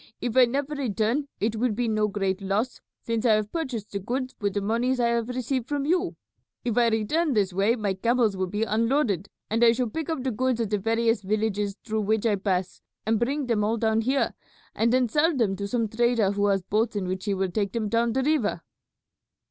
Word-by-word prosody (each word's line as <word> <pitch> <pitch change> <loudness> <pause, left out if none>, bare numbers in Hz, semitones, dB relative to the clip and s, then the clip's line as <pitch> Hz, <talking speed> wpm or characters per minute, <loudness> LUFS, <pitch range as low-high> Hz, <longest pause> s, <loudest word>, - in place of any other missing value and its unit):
If 240 -2 -3
I 260 -1 +8
never 275 +4 -2
return 245 +1 0
it 220 +2 0
will 240 0 +1
be 240 +2 -1
no 215 -1 +1
great 195 -1 -1
loss, 205 +6 -1 0.2
since 230 -1 -1
I 230 -3 +5
have 215 -1 0
purchased 255 -11 -4
the 200 - -2
goods 255 +6 -3
with 200 -1 -1
the - - +2
monies 235 +5 0
I 235 -1 +3
have 235 0 0
received 255 0 -2
from 285 -1 -1
you. 355 +3 +1 0.5
If 235 -3 0
I 240 -1 +4
return 265 +9 +1
this 200 -4 +1
way 200 +5 +2
my 210 -5 -1
camels 230 +1 +1
will 185 0 -1
be 210 +4 -1
unloaded, 225 - +1 0.2
and 225 +2 +1
I 230 -1 +7
shall 240 -2 -1
pick 320 +3 -4
up 320 -6 -2
the 260 - 0
goods 255 +2 0
at 225 -3 -1
the 210 - +1
various 225 +1 +1
villages 205 0 -1
through 220 -1 -1
which 215 +2 0
I 215 -3 +3
pass 190 -2 -2 0.2
and 220 0 +2
bring 275 +4 0
them 230 -4 +1
all 220 +2 +1
down 220 0 +1
here, 265 +4 +1 0.4
and 230 +1 +1
then 255 0 +3
sell 300 +6 +2
them 210 -6 +1
to 200 +1 -3
some 230 +1 0
trader 230 -2 +2
who 205 0 +1
has 195 -2 +1
boats 215 +4 0
in 195 -3 -2
which 185 +2 -3
he 200 -2 0
will 190 -1 -1
take 200 -1 -1
them 225 -2 -1
down 230 +1 +1
the 265 - +1
river." 290 -7 0
225 Hz, 230 wpm, -26 LUFS, 205-250 Hz, 0.5 s, I